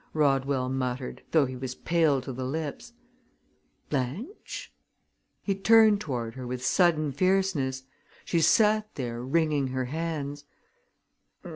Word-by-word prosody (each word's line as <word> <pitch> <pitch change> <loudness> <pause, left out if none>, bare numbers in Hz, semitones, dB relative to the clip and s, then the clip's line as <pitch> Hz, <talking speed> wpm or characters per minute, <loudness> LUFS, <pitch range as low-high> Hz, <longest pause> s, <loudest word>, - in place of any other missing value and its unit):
Rodwell 135 -3 +2
muttered, 130 -1 -3
though 155 -4 +4
he 130 0 -6
was 130 0 -5
pale 160 -5 +2
to 130 +1 -6
the 130 +1 -5
lips. 155 - -4 1.0
"Blanche 150 - -4 0.3
" - - -49
He 200 - 0
turned 215 +1 +5
toward 120 - -3
her 130 0 -7
with 125 +1 -4
sudden 155 -4 +3
fierceness. 150 -5 +1 0.4
She 170 - +1
sat 215 +3 +3
there, 120 -3 -4
wringing 150 0 +1
her 130 0 -2
hands. 145 -1 -4
145 Hz, 125 wpm, -27 LUFS, 130-170 Hz, 1.0 s, turned